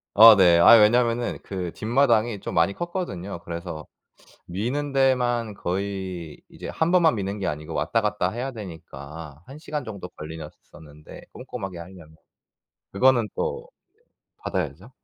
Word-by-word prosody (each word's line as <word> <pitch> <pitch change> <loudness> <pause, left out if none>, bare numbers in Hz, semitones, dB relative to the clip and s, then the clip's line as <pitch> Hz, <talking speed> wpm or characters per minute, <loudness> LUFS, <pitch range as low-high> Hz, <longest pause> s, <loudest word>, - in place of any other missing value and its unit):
어, 110 +1 +10
네. 90 -4 +5
아이 115 +7 +9
왜냐면은 120 +2 +2
그 90 -3 -5
뒷마당이 115 -2 +1
좀 - - -5
많이 85 +4 +2
컸거든요. 100 - -5
그래서 85 -2 -6 0.6
미는 125 +11 -3
데만 125 -4 +1
거의 95 -4 -4
이제 - - -9
1 160 +2 0
번만 165 -7 +4
미는 100 0 -4
게 95 - -1
아니고 75 +2 -5
왔다 85 +10 0
갔다 105 -4 -1
해야 125 +6 -4
되니까 80 - -10
1 140 - -10
시간 150 -3 -5
정도 100 -5 -7
걸리셨었는데 75 -1 -11
꼼꼼하게 95 -8 -7
하려면. 85 -3 -12 0.8
그거는 120 +1 +3
또 475 0 -3 0.7
받아야죠. - - -4
100 Hz, 290 characters per minute, -24 LUFS, 85-120 Hz, 0.8 s, 어